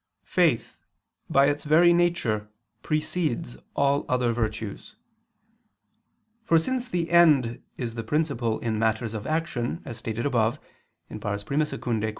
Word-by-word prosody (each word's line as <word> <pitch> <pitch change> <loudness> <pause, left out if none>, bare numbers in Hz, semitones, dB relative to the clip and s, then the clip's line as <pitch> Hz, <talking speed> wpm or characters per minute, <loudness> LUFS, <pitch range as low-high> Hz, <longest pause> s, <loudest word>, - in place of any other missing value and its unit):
Faith, 165 -10 +1 0.5
by 135 0 +5
its 145 0 0
very 165 +3 +5
nature, 170 -12 +1 0.3
precedes 155 - -2 0.2
all 140 0 +2
other 125 -2 +1
virtues. 110 - -4 1.5
For 170 -7 +4
since 250 +9 -1
the 170 -4 -2
end 150 -9 +4 0.2
is 120 -3 -4
the 115 - -4
principle 130 -4 0
in 110 -2 -1
matters 110 0 0
of 105 -2 -5
action, 155 -4 -2
as 120 -4 -7
stated 115 0 -3
above 120 -5 +1 0.5
(I 105 -1 -3
II, 140 +9 0
Q. 115 -6 -2
130 Hz, 130 wpm, -26 LUFS, 115-160 Hz, 1.5 s, by